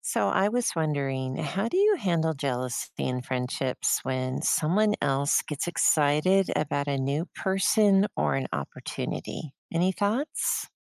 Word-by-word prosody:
So, 100 - 0
I 195 - +3
was 245 +2 0
wondering, 135 -5 -1
how 195 +4 -2
do 355 - -2
you 410 +2 +5
handle 165 - 0
jealousy 130 -4 -3
in 125 0 -2
friendships, 125 +1 -1
when 130 0 -2
someone 210 +7 +2
else 140 0 +2
gets 150 +1 -4
excited 170 +3 +3
about 145 -1 -1
a 140 - 0
new 140 +6 -1
person 195 +1 +3
or 75 -2 +1
an 65 -1 -1
opportunity? 150 - -5 0.2
Any 175 +3 +1
thoughts? 220 - -1
150 Hz, 140 wpm, -27 LUFS, 130-195 Hz, 0.2 s, you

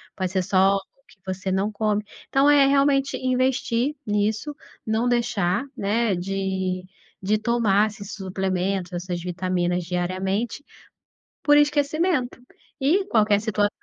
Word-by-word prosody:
pode 185 -2 -2
ser 190 -1 +1
só 190 +1 +3
o 200 +8 -8
que - - -22
você 190 0 -3
não 195 +3 0
come, 210 0 0 0.3
então 275 +2 +4
é 290 -1 +6
realmente 275 0 +2
investir 255 +1 0
nisso, 215 +7 -1 0.3
não 220 +2 0
deixar, 235 -4 +1
né, 215 0 +1
de 190 0 -2 0.4
de 210 +3 +1
tomar 215 -3 +2
esses 205 -1 -8
suplementos, 190 -1 -2
essas 175 0 -4
vitaminas 180 0 -1
diariamente 185 - -2 0.8
por 290 - +5
esquecimento 295 -1 +1 0.4
e 345 +9 +2
qualquer 210 - +3
situação 210 -1 +1
205 Hz, 125 wpm, -24 LUFS, 190-250 Hz, 0.8 s, é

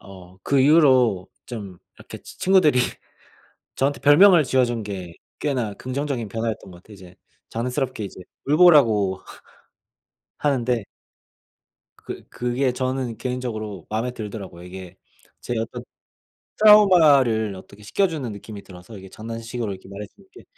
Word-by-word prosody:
어 95 -1 -14
그 140 +6 +2
이후로 130 - +4 0.2
좀 100 -7 -8 0.2
이렇게 - - -11
치 - - -14
친구들이 180 -8 +4 1.0
저한테 140 +2 0
별명을 160 +3 +6
지어준 120 -3 0
게 95 -5 -7 0.3
꽤나 125 -8 -2
긍정적인 130 -2 -4
변화였던 110 -2 -4
것 90 -1 -14
같아요 105 - -15
이제. 90 -2 -15 0.3
장난스럽게 125 0 -3
이제 95 - -9 0.3
울보라고 135 - +4 1.2
하는데 125 -6 0 1.1
그 - - -9
그게 125 +2 -1
저는 130 -2 -3
개인적으로 110 -6 -5
마음에 115 +3 -2
들더라고요. 105 -6 -8
이게 90 0 -10 0.5
제 120 - -4
어떤 110 0 -5 0.8
트라우마를 150 - +5
어떻게 100 +2 -14
씻겨 195 - +1
주는 150 -8 -5
느낌이 100 0 -10
들어서 90 +3 -13
이게 95 - -12
장난식으로 115 +1 -6
이렇게 95 0 -11
말해 100 +1 -8
주는 200 -2 -22
게 380 - -15
115 Hz, 320 characters per minute, -22 LUFS, 100-135 Hz, 1.2 s, 별명을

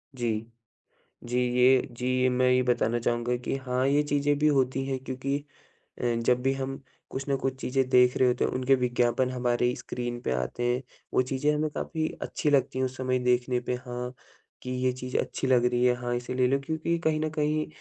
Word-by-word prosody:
जी। 115 -2 -2 0.7
जी 120 +1 -1 0.2
ये 130 +1 +6 0.2
जी 125 - -3 0.2
ये 130 - +4
मैं 125 0 +2
ये 125 0 +4
बताना 120 -1 +1
चाहूँगा 120 +1 0
कि 125 - -3
हाँ, 130 0 -1
ये 145 +2 +3
चीज़ें 145 0 +1
भी 150 - +2
होती 135 -2 +1
हैं 135 -1 -2
क्योंकि 130 +2 -2 0.6
अ, - - -2
जब 120 +2 +2
भी 135 - +2
हम 135 +1 -4 0.3
कुछ 135 +1 -4
न 140 - +2
कुछ 135 0 -2
चीज़ें 130 0 0
देख 125 -1 +5
रहे 130 - +4
होते 125 - +1
हैं, - - +1
उनके 130 +1 +3
विज्ञापन 125 0 +1
हमारी 125 0 +1
स्क्रीन 120 -1 -5
पे - - -2
आते 65 - -2
हैं, 120 +1 +1 0.3
वो - - +5
चीज़ें 135 +3 0
हमें 155 +1 0
काफ़ी 160 +1 -2 0.2
अच्छी 150 - -1
लगती 135 -2 +2
हैं, 130 - +2
उस 130 - -7
समय 130 -1 0
देखने 125 0 +1
पे 125 0 -2
हाँ 125 0 -4 0.5
कि 125 - -5
ये 125 0 0
चीज़ 125 0 -4
अच्छी - - -2
लग 125 -2 +4
रही 125 0 +2
है। 125 0 +4
हाँ, 120 0 -1
इसे 120 +1 -4
ले 125 0 +3
लो 135 +2 +2
क्योंकि 160 +1 -1
कहीं 155 -1 +2
न 155 0 -1
कहीं 155 0 0
125 Hz, 210 wpm, -27 LUFS, 125-135 Hz, 0.7 s, ये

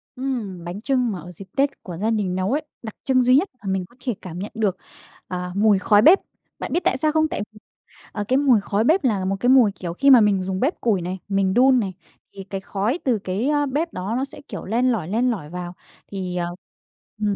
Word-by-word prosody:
Ừm, 235 -9 -4
bánh 175 +5 -6
chưng 250 -3 +1
mà 190 - -5
ở 175 +2 -10
dịp 190 +3 -11
Tết 280 +1 0
của 175 -3 -7
gia 215 +5 0
đình 205 -5 0
nấu 185 +3 -1
ấy, 295 +3 +1 0.2
đặc 220 -2 -7
trưng 255 -2 +3
duy 250 +1 +5
nhất 340 +8 +3
mà 200 - -9
mình 190 -1 -1
có 215 - -23
thể 245 -4 -1
cảm 175 -2 -7
nhận 200 - -5
được, 205 -4 0 0.5
à, 180 -1 -4
mùi 205 -1 +4
khói 205 +1 +4
bếp. 335 - +7 0.4
Bạn - - -4
biết - - +3
tại - - +2
sao 305 +3 +1
không? 315 0 +2
Tại 295 - -4
vì, 215 - -15 0.5
ờ, 205 - -3
cái 260 - +3
mùi 265 -6 +4
khói 200 +2 0
bếp 320 +8 +3
là 205 -7 +1
một 195 +1 0
cái 245 - +1
mùi, 255 -5 +6
kiểu, 175 -3 -6
khi 275 +10 +3
mà 255 -4 +9
mình 200 -3 +2
dùng 190 0 -3
bếp 280 - -1
củi 210 -6 +1
này, 180 +2 -4
mình 195 -1 +1
đun 255 +3 +5
này 195 -4 -2 0.4
thì 195 - -8
cái 195 0 -6
khói 210 - -2
từ 245 -5 +1
cái, 195 +6 -2
a, 290 -1 +2
bếp 295 +5 -2
đó 185 +4 -3
nó 265 - 0
sẽ, - - -12
kiểu, - - -7
len 245 +5 +2
lỏi, 200 -9 -2
len 240 +6 +1
lỏi 165 -10 -5
vào, 175 +1 -6 0.4
thì, 185 -3 -4
ờ, 175 - 0 0.8
ừm, 205 -1 +1
210 Hz, 250 wpm, -22 LUFS, 190-255 Hz, 0.8 s, mà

